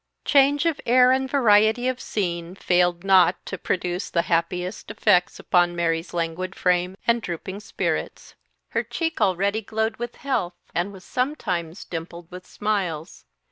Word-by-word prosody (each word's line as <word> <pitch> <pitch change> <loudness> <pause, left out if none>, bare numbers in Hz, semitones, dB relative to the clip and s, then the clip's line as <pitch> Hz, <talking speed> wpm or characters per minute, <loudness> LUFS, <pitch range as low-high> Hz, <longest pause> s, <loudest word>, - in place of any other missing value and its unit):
Change 285 +2 +4
of 330 -3 0
air 250 +1 +6
and 265 0 +1
variety 220 -2 +4
of 255 -1 -2
scene 175 -3 -3
failed 175 -2 +1
not 185 -2 +4
to - - -4
produce 180 -1 -2
the 170 - +1
happiest 180 +3 -2
effects 180 - +2
upon 175 -1 +2
Mary's 165 0 -1
languid 170 +2 -3
frame 180 +1 +1
and 235 0 +2
drooping 190 +2 -5
spirits. 210 - -3 0.4
Her - - 0
cheek, 325 -1 -3
already 200 +3 +1
glowed 220 +1 -2
with 240 0 -5
health, 185 -11 -2 0.2
and 175 +4 -1
was 190 -2 -12
sometimes 200 - -3
dimpled 170 0 -7
with 180 0 -10
smiles. 190 -6 -3
185 Hz, 145 wpm, -24 LUFS, 175-225 Hz, 0.4 s, air